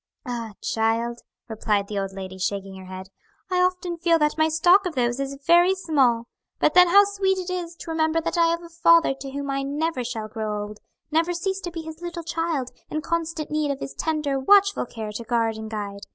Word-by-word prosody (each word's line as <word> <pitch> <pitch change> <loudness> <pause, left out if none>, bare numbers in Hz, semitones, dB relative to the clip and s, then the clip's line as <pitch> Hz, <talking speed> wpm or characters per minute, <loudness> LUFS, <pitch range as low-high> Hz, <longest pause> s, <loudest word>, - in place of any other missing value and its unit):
"Ah, 235 -4 -4
child!" 230 +1 0 0.3
replied 210 -3 -1
the 205 -1 -3
old 195 0 -3
lady, 190 -1 -8
shaking 195 0 -3
her 190 - -10
head, 185 +1 -8 0.4
"I 360 0 +3
often 360 -1 0
feel 335 0 +3
that 300 -1 +1
my 315 0 +2
stock 350 +5 +4
of 335 - -6
those 240 0 0
is 275 0 -3
very 345 +3 +5
small. 265 -10 +2 0.3
But - - +2
then 360 0 +8
how 400 +4 +7
sweet 390 -1 0
it 365 0 -4
is 350 -2 -4
to 330 - -8
remember 320 0 +1
that 335 +1 -2
I 335 -1 +4
have 335 +1 -1
a 340 - -11
Father 335 -2 +4
to 275 - -6
whom 280 +1 -4
I 275 0 -1
never 285 0 -2
shall 230 -3 -4
grow 215 -1 -3
old; 210 0 -9 0.3
never 330 +3 +2
cease 380 +3 -2
to 350 -3 -6
be 330 -1 -6
His 320 +1 -9
little 345 -1 -5
child, 320 -5 -2 0.2
in 310 - -2
constant 330 -1 -3
need 305 -1 0
of 275 -1 -2
His 270 - -6
tender, 300 -4 -1
watchful 400 +2 +4
care 220 -2 -6
to 210 +3 -6
guard 230 -1 0
and 220 0 -6
guide. 205 -2 -5
305 Hz, 220 wpm, -24 LUFS, 230-340 Hz, 0.4 s, then